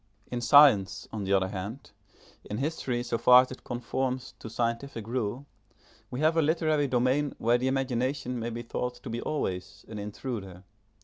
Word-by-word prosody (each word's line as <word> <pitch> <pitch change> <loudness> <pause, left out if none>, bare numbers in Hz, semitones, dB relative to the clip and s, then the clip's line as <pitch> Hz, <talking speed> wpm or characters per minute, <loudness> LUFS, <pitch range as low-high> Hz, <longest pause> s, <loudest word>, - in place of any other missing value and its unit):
In 120 -1 -2
science, 135 -8 +5
on 105 -3 -3
the 100 - +1
other 95 -1 +2
hand, 100 +8 -6 0.6
in 105 - -3
history 130 -3 -2
so 120 -1 -2
far 125 0 +8
as 130 - -10
it 130 - -9
conforms 130 +2 -3
to 110 - -8
scientific 115 +1 -2
rule, 120 +2 -2 0.6
we 125 - -4
have 160 +1 +3
a 165 - +4
literary 155 -2 +2
domain 130 +3 +1
where 120 +2 +2
the 130 - 0
imagination 130 -1 -1
may 115 +1 -3
be 120 +1 -5
thought 125 +1 -3
to - - -9
be 115 - -3
always 95 -9 -4
an 110 -2 -7
intruder. 100 -3 -6
120 Hz, 175 wpm, -28 LUFS, 110-135 Hz, 0.6 s, far